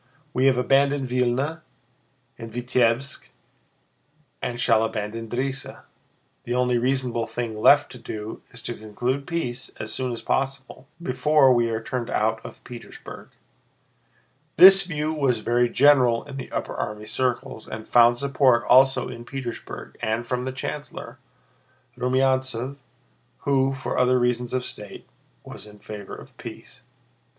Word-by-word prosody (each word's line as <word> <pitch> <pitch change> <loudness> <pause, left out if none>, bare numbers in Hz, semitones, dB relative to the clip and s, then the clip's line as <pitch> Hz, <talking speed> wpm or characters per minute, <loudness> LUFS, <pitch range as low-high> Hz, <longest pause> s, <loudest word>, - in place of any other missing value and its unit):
We 130 +2 +3
have 130 -2 +4
abandoned 135 +1 +2
Vílna 125 +6 0 0.7
and 115 0 -9
Vítebsk 125 +2 0 1.1
and 120 -1 -3
shall 115 -3 +3
abandon 110 +1 -4
Drissa. 135 +2 -4 0.6
The 120 - -3
only 125 -1 +2
reasonable 125 -2 0
thing 115 -3 -4
left 145 +4 +6
to 125 - -10
do 110 -1 -7
is 115 -2 -11
to - - -3
conclude 120 +6 -3
peace 135 -8 -3
as 110 - -4
soon 130 -1 -1
as 115 -1 -6
possible, 135 -1 -2
before 150 -3 +3
we 120 -1 +2
are 110 0 -3
turned 120 0 -3
out 110 +1 0
of - - -11
Petersburg." 120 -2 -11 1.3
This 195 +1 +10
view 155 -2 -2
was 135 -7 +1
very 120 +1 +2
general 130 -5 +4
in 140 -1 -9
the 130 - -7
upper - - -3
army 105 0 -4
circles 120 0 -2
and 110 0 -7
found 120 0 +5
support 130 -3 +3
also 130 0 +5
in 120 -1 -8
Petersburg 125 -1 -7
and 110 +2 -1
from 125 +1 -2
the 130 - -2
chancellor, 135 -2 -6 0.8
Rumyántsev, 130 0 0 0.6
who, 135 -1 +1
for 135 - -3
other 125 0 +4
reasons 125 -1 0
of 130 -1 -1
state, 105 -4 -7 0.4
was - - -10
in 105 0 -14
favor 105 -1 -8
of - - -14
peace. - - -10
125 Hz, 140 wpm, -24 LUFS, 115-135 Hz, 1.3 s, This